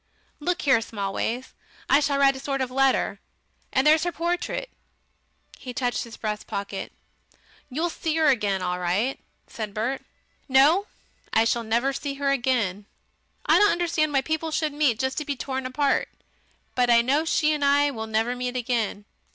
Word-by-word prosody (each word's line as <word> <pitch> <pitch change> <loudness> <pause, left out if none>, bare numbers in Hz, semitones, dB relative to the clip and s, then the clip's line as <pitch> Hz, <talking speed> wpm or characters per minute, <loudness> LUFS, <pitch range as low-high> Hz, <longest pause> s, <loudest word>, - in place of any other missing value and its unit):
Look 355 +4 -1
here, 265 -6 +4
Smallways, 225 +4 -3 0.3
I 280 - +5
shall 285 -1 +1
write 275 -1 +4
a - - -7
sort 275 0 -2
of 260 -1 -2
letter 270 0 +2 0.5
And 265 +1 +2
there's 310 +1 +5
her 350 - 0
portrait." 350 +9 -2 0.9
He 250 -2 -8
touched 245 -2 -1
his 230 - -11
breast 210 -1 -4
pocket. 200 -1 -5 0.8
"You'll 320 +6 -1
see 320 -1 -2
'er 315 - +3
again 205 -9 +2
all 180 0 -1
right," 190 +9 0 0.3
said 215 -3 -6
Bert. 240 +5 -1 0.5
"No! 300 +10 +5 0.5
I 225 - +5
shall 235 +1 +1
never 235 +5 0
see 280 +1 -4
her 280 0 0
again.... 230 -7 0 0.6
I - - +5
don't 415 0 +6
understand 335 -3 0
why 275 -2 +2
people 315 +3 -2
should 310 -1 -1
meet 290 -6 +2
just 265 +4 -1
to - - -3
be 285 -1 -3
torn 265 0 -3
apart. 280 +2 +1 0.6
But 245 -1 +2
I 235 -1 +6
know 280 +5 +2
she 310 -1 +2
and 295 -1 -2
I 285 +1 +4
will 220 -4 -5
never 225 +3 0
meet 250 0 -3
again. 230 -4 -2
265 Hz, 175 wpm, -25 LUFS, 230-295 Hz, 0.9 s, don't